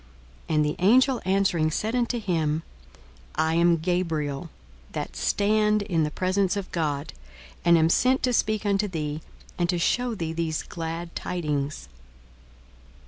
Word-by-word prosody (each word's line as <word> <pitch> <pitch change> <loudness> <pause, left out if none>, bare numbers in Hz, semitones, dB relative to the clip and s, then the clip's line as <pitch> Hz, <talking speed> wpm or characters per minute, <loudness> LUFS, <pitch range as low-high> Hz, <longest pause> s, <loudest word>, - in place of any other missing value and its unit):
42:001:019 160 - +1
And 150 0 +3
the 150 - -1
angel 250 +7 +4
answering 190 -4 +2
said 215 +8 -2
unto 240 0 0
him, 160 -6 0 0.7
I 160 +1 +1
am 170 0 +4
Gabriel, 165 -3 -1 0.4
that - - -4
stand 210 0 +2
in 170 -5 0
the 150 - +1
presence 185 +4 0
of 200 - -5
God; 145 - -2 0.5
and 170 -1 +6
am 160 0 +4
sent 255 +10 +3
to 250 - +2
speak 215 -2 +1
unto 205 +1 +2
thee, 155 -4 -4 0.4
and 175 0 +1
to 175 - +1
shew 240 +7 +1
thee 165 -4 -3
these 165 -1 -2
glad 165 0 -6
tidings. 145 - -3
175 Hz, 145 wpm, -26 LUFS, 160-205 Hz, 0.7 s, and